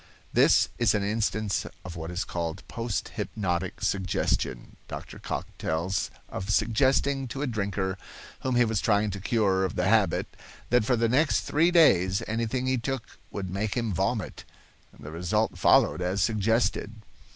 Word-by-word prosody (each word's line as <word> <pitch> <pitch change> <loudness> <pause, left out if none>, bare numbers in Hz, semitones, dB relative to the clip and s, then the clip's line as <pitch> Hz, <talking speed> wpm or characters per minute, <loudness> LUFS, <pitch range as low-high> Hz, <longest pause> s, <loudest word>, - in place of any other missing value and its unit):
*This - - +5
is 115 -4 +3
an 100 - 0
instance 110 0 -1 0.2
of 90 -1 -7
what 80 0 -5
is 90 0 -2
called 85 +1 -4
post 115 -3 -3
hypnotic 90 -3 -3
suggestion. 65 -10 -1
Dr. - - -8
Cocke - - -5
tells 85 +4 -1 0.2
of 95 +2 -6
suggesting 130 +7 +2
to 135 +4 -4
a - - +1
drinker 100 -5 -2 0.4
whom 130 -1 -1
he 120 0 +5
was 110 -3 0
trying 105 -1 +2
to 100 - -5
cure 100 -2 +1
of 95 - -2
the 90 0 +1
habit 105 -1 +3 0.5
that 120 -3 +4
for 125 - +3
the 115 0 +2
next 140 +6 +2
three 165 +4 +2
days 100 - +4
anything 115 +3 -1
he 130 -1 +1
took 130 +1 -5
would 95 -2 -5
make 100 +2 -2
him 115 -4 -1
vomit; 95 +3 -2 0.6
the 75 - -9
result 90 +7 0
followed - - +4
as 90 +2 -1
suggested. 110 -1 +1
105 Hz, 160 wpm, -27 LUFS, 95-115 Hz, 0.6 s, This